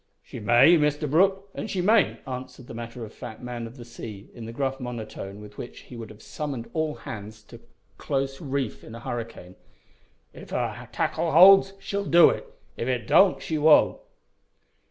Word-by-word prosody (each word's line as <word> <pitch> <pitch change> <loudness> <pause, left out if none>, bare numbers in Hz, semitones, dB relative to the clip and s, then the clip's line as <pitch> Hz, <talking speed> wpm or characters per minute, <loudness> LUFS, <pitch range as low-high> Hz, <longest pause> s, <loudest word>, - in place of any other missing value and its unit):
"She - - -9
may, 120 +10 +6
Mr 150 0 +1
Brooke, 195 +6 +2
an' - - -5
she 195 -3 -3
mayn't," 210 +4 +3
answered 130 0 -7
the - - -10
matter 115 0 -7
of 110 - -13
fact 110 - -9
man 120 -2 -6
of 115 +4 -13
the 120 - -10
sea, 110 -4 -10
in 115 -2 -9
the - - -6
gruff 135 +2 -2
monotone 110 -5 -7
with 105 0 -12
which 120 - -8
he 125 - -13
would 115 -3 -8
have 110 -1 -14
summoned 140 -6 -5
all 155 -2 -1
hands 105 0 -9
to - - -13 0.4
close 135 +1 -2
reef 135 -5 -3
in 115 - -10
a - - -8
hurricane. 115 -6 -6 0.8
"If - - -12
her - - -3
tackle 165 -1 -1
holds 195 +3 +8
she'll 200 0 -3
do 170 -2 +7
it. - - -6 0.3
If 115 - -3
it 125 -4 -1
don't 190 - +5
she 155 -2 -2
won't." 150 +1 +5
125 Hz, 185 wpm, -26 LUFS, 115-155 Hz, 0.8 s, holds